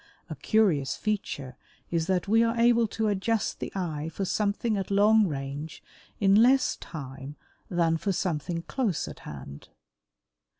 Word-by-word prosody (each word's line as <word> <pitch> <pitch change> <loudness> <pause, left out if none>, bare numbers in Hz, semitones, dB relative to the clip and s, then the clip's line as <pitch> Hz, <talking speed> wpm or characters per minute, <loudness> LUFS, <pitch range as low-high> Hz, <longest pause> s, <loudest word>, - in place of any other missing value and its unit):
A - - -3
curious 155 -12 +2
feature 140 - -3 0.3
is 165 -1 0
that 185 0 0
we 225 +3 +4
are 230 0 +1
able 235 -1 +4
to 220 +1 -2
adjust 210 +2 0
the - - -5
eye 160 -5 -3
for 195 +5 -3
something 210 +3 0
at 195 -2 -3
long 210 +1 +5
range 145 +1 -6 0.4
in 195 -1 +4
less 255 +2 +4
time 140 -2 -8 0.3
than 165 -2 +2
for 200 +4 -1
something 170 -1 -2
close 225 - -1
at - - -9
hand. 70 0 -10
190 Hz, 145 wpm, -27 LUFS, 150-215 Hz, 0.4 s, long